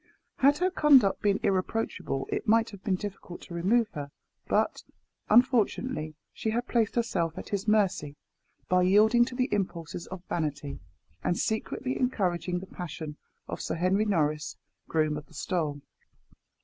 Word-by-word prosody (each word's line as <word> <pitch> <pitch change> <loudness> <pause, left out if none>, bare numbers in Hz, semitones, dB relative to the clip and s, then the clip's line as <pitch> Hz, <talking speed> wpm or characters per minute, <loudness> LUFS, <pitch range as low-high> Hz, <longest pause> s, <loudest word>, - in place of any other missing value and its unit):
Had 280 +2 +5
her 365 +3 +1
conduct 275 - +5
been 205 -1 +2
irreproachable, 195 - -1
it 410 - -2
might 225 +1 +4
have 200 -2 -12
been 195 -4 +1
difficult 190 -2 -7
to - - -10
remove 210 +7 +2
her; 145 -1 -6 0.4
but, - - +1 0.5
unfortunately, 225 - +2 0.2
she 220 - -2
had 240 +3 -1
placed 230 -3 +1
herself 175 -9 0
at - - -7
his 200 0 -2
mercy, 195 -9 +2 0.5
by 180 0 +3
yielding 215 +6 +5
to 250 - -7
the 255 -2 0
impulses 175 -4 -3
of 185 -1 -8
vanity, 145 -3 -3 0.4
and 175 - +1
secretly 255 +4 -2
encouraging 185 -8 0
the 180 - -6
passion 160 -4 -7 0.3
of - - -5
Sir - - -2
Henry 185 +5 +2
Norris, 155 -6 0 0.3
groom 155 -2 +1
of 150 - -9
the 160 - -18
stole. 150 -3 -2
195 Hz, 150 wpm, -28 LUFS, 165-230 Hz, 0.5 s, Had